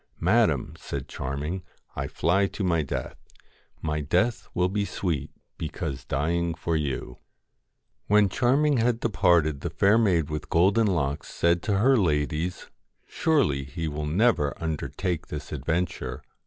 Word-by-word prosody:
' - - -36
Madam,' - - +2
said - - -5
Charming, 75 +7 -4 0.3
'I 70 0 -2
fly 95 +8 +2
to 100 - -5
my 85 -3 +2
death. 70 - -4 0.6
My 75 -1 -1
death 90 - 0
will 90 0 +3
be 100 +2 -1
sweet 90 -6 -2 0.3
because 80 -3 -4
dying 85 +4 0
for 85 -1 -2
you.' 70 -5 -3 0.9
When 105 0 +5
Charming 135 +8 +2
had 115 0 +2
departed 85 -10 +2
the 85 - -2
Fair 100 +7 +3
Maid 85 -9 +2
with 75 0 -4
Golden 100 +6 +4
Locks 75 -6 -1
said 85 0 +2
to 100 +1 0
her 130 +7 +5
ladies: 80 -1 0 0.2
' - - -46
Surely 135 - +1
he 80 +4 -5
will 75 0 -3
never 85 -4 +2
undertake 80 +2 -3
this 75 0 -7
adventure. 80 -3 -2
85 Hz, 145 wpm, -26 LUFS, 75-100 Hz, 0.9 s, When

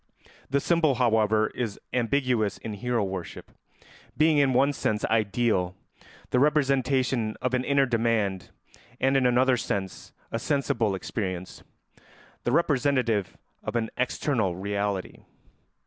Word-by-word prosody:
The 140 +1 +2
symbol, 160 -2 +2
however, 110 -3 +2
is 110 -5 -4
ambiguous 125 -4 +1
in 110 - -6
hero 120 +2 -1
worship, 95 -3 -6 0.7
being 155 -1 +4
in 140 -2 +3
one 135 +3 +3
sense 105 -5 -1
ideal, 105 -4 +1 0.6
the 125 - +3
representation 135 -5 +1
of 125 0 -2
an 125 0 +1
inner 140 0 +3
demand, 115 -6 0 0.5
and 135 +1 +2
in 130 -2 +4
another 125 +1 +3
sense 95 -4 -4 0.2
a 115 - -2
sensible 130 -6 0
experience, 95 -2 -5 0.8
the 120 - +1
representative 130 - +1 0.2
of - - -5
an 115 -2 -1
external 120 - 0
reality. 100 0 -3
120 Hz, 120 wpm, -26 LUFS, 105-135 Hz, 0.8 s, being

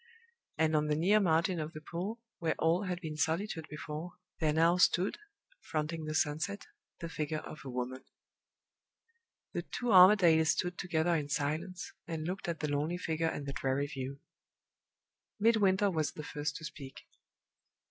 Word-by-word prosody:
And 160 0 +2
on 150 0 +2
the 150 - +2
near 190 +7 +4
margin 170 -1 +2
of 155 +1 -4
the 155 - -7
pool, 180 +8 -5 0.2
where 165 -2 0
all 170 +5 +2
had 180 -1 -2
been 155 -3 -5
solitude 160 +2 -1
before, 150 +3 -6 0.3
there 155 -2 +2
now 165 +3 +4
stood, 180 - +3 0.4
fronting 155 0 -3
the 155 0 -3
sunset, 155 +7 -1 0.4
the 170 - -3
figure 155 -1 -3
of 155 - -9
a 135 - -7
woman. 125 +1 -4 1.5
The - - -1
two 245 -1 -4
Armadales 180 -4 +7
stood 180 0 0
together 170 -1 +1
in 150 -3 -1
silence, 160 +6 -2
and 160 -2 -4
looked 185 +2 -4
at 170 -2 -3
the 150 - 0
lonely 150 +5 0
figure 160 -2 -1
and 145 - -5
the 140 - -4
dreary 135 0 0
view. 135 -1 -6 1.2
Midwinter 205 -3 +4
was 155 -3 -1
the 155 - -7
first 150 -1 -3
to 165 - -7
speak. 135 -4 -9
160 Hz, 160 wpm, -32 LUFS, 150-180 Hz, 1.5 s, Armadales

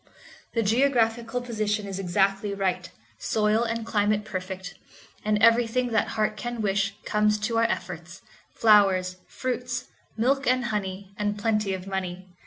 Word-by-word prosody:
The 230 - +2
geographical 235 0 +2
position 215 -3 -1
is 195 -1 -5
exactly 195 +2 +1
right, 185 -2 -1 0.3
soil 215 +1 +1
and 230 -1 -2
climate 210 -1 +1
perfect, 190 -1 -5 0.5
and 210 0 +2
everything 235 +2 +4
that 225 -1 +1
heart 215 0 +1
can 240 +3 -5
wish 200 -1 0
comes 210 0 +2
to 225 +1 0
our 230 - +4
efforts—flowers, 185 +1 +1
fruits, 250 0 -3 0.3
milk 270 +5 +1
and 255 0 +2
honey, 200 -3 -4
and 205 0 -1
plenty 210 -2 0
of 185 0 -8
money. 185 -2 -4
210 Hz, 135 wpm, -26 LUFS, 195-230 Hz, 0.5 s, everything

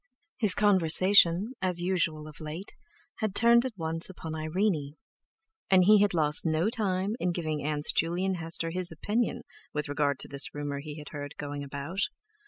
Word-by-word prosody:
His 210 -6 +2
conversation, 185 -1 +5 0.2
as 180 -2 0
usual 170 -4 -1
of 150 - -12
late, 160 +6 -6 0.5
had 215 -4 -2
turned 235 +1 +5
at 230 -6 -10
once 165 0 -1
upon 165 -4 -7
Irene, 155 -2 -1 0.7
and 185 -1 +6
he 210 +1 +6
had 205 -3 +2
lost 150 -2 +2
no 165 +6 +1
time 200 -3 -1
in 180 - 0
giving 155 -4 -3
Aunts 150 0 -1
Juley 170 +3 0
and 190 -1 0
Hester 165 0 -1
his 180 0 -1
opinion 210 +9 -1 0.3
with 150 0 -2
regard 145 -1 0
to - - -5
this 140 0 -1
rumour 145 -1 -3
he 150 +1 -8
heard 145 0 -6
was 145 - -4
going 145 0 -5
about. 140 +6 -6
165 Hz, 175 wpm, -28 LUFS, 150-190 Hz, 0.7 s, and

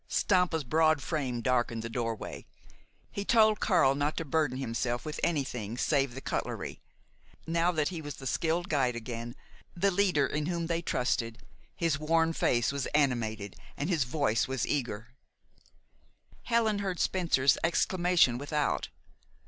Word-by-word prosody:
Stampa's 180 -5 +2
broad 155 +3 +3
frame 135 -7 -2
darkened 120 -2 0
the - - -3
doorway. 115 -1 -4 0.6
He 200 - -3
told 215 -1 +4
Karl 135 - +4
not 145 +2 -1
to 165 - -2
burden 150 -3 0
himself 120 0 -2
with 155 -1 -5
anything 125 -9 -1
save 135 -3 +1
the 135 - -6
cutlery. - - -4 0.6
Now 170 +2 +2
that 155 -3 +1
he 170 -3 -5
was 145 -1 -6
the 135 - -11
skilled 165 +6 0
guide 130 -7 +1
again, 120 +1 -6 0.4
the 195 +3 +2
leader 180 -7 +2
in 150 +3 -2
whom 170 -1 -1
they 165 0 -1
trusted, 120 -5 -1 0.3
his 165 -5 0
worn 165 +1 +2
face 120 -6 +1
was 140 -2 -2
animated 110 -8 0 0.2
and 145 +6 -2
his 160 -6 +2
voice 125 -4 +1 0.2
eager. 120 -5 -2 1.4
Helen 225 -3 +2
heard 190 -3 -3
Spencer's 160 -8 +2
exclamation 175 -6 +3
without. 145 +1 -1
145 Hz, 140 wpm, -30 LUFS, 125-170 Hz, 1.4 s, told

